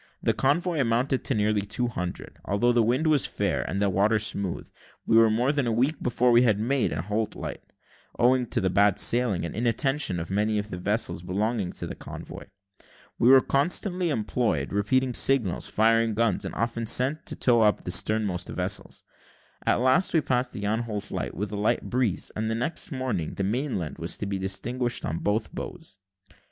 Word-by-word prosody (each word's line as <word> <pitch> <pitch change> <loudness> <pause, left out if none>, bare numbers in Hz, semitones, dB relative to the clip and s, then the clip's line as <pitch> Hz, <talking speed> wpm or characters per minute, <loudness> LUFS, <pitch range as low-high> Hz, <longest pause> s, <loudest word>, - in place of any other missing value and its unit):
The - - +2
convoy 160 +4 0
amounted 125 +2 +1
to 135 - 0
nearly 105 0 +1
two 105 +5 -2
hundred. 90 -6 -6
Although 110 +5 +1
the 120 -1 +3
wind 125 +7 +1
was 155 -3 +3
fair, - - -1
and 95 +5 -2
the 100 - +2
water 100 +3 +2
smooth, 100 -3 -2 0.4
we - - +2
were 115 0 +6
more 120 +5 +2
than 145 -4 -1
a - - +1
week 130 +7 0
before 125 0 +2
we 120 0 +6
made 115 +2 0
Anholt 105 +8 -2
light, - - -6 0.6
owing 125 0 +3
to - - -1
the 95 -2 0
bad 100 0 +3
sailing 120 -8 +2
and - - -6
inattention 120 -1 0
of 85 - -6
many 105 +2 +1
of 105 +1 -4
the 90 - -5
vessels 105 -1 -1
belonging 100 +2 -2
to - - -5
the - - -6
convoy. - - -9 0.7
We 120 - +5
were 135 0 +8
constantly 175 +6 0
employed 115 -4 -1
repeating 125 +6 +1
signals, 115 -8 +2
firing 115 +2 +2
guns, 115 -3 0
and - - -6
often 115 0 -2
sent 130 +6 +3
back - - -38
to - - -4
tow 120 -2 +3
up 105 -3 +2
the 90 - -3
sternmost 100 -1 +1
vessels. - - -3 0.6
At - - +3
last 145 +9 +3
we 160 - +4
passed 125 -2 -1
the 100 - -6
Anholt 110 -1 -3
light, - - -4
with 105 +1 -4
a - - -4
light 105 +3 -1
breeze; 125 -7 0
and 110 +1 -2
the 110 - -1
next 165 - -2
morning, 130 - -3
the 100 - -2
mainland 105 - -2
was 85 +1 -4
to - - -4
be 100 -1 -3
distinguished 120 +6 -3
on 80 - -3
both 105 +1 -1
bows. 160 - -8
115 Hz, 190 wpm, -26 LUFS, 100-125 Hz, 0.7 s, were